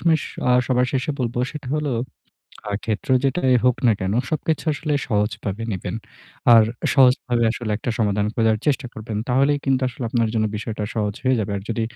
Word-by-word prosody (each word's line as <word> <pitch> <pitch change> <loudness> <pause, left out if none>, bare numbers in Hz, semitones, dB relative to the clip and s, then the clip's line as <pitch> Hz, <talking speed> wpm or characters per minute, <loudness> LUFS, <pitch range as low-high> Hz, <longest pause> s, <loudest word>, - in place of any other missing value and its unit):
সমিস 160 -3 +2 0.3
আ - - +5
সবার 125 -1 +2
শেষে 135 +3 0
বলবো। 120 0 -2
সেটা 150 -4 -7
হল 150 -1 -2 0.8
আ - - -2
ক্ষেত্র 110 +2 -3 0.2
যেটাই 135 -1 +2
হোক 125 -1 +4
না - - +6
কেন? 95 +1 -1 0.2
সবকিছু 155 0 -1
আসলে 150 +1 -3 0.2
সহজভাবে 105 0 -1
নিবেন। 95 +2 -4 0.6
আর 115 -1 +7 0.3
সহজভাবে 125 -2 +4
আসলে 115 -2 -5
একটা 120 - -3
সমাধান 105 -1 +1
খোঁজার 110 -1 +2
চেষ্টা 140 -2 +1
করবেন। 110 0 -6
তাহলেই 140 +3 +3
কিন্তু 135 -1 +2
আসলে 125 0 -7
আপনার 115 -2 +1
জন্য 110 -1 +2
বিষয়টা 110 0 -4
সহজ 105 -3 -1
হয়ে 130 -1 +3
যাবে। 100 -1 -3
আর 95 - -5
যদি 115 0 -1
120 Hz, 180 wpm, -22 LUFS, 110-135 Hz, 0.8 s, আর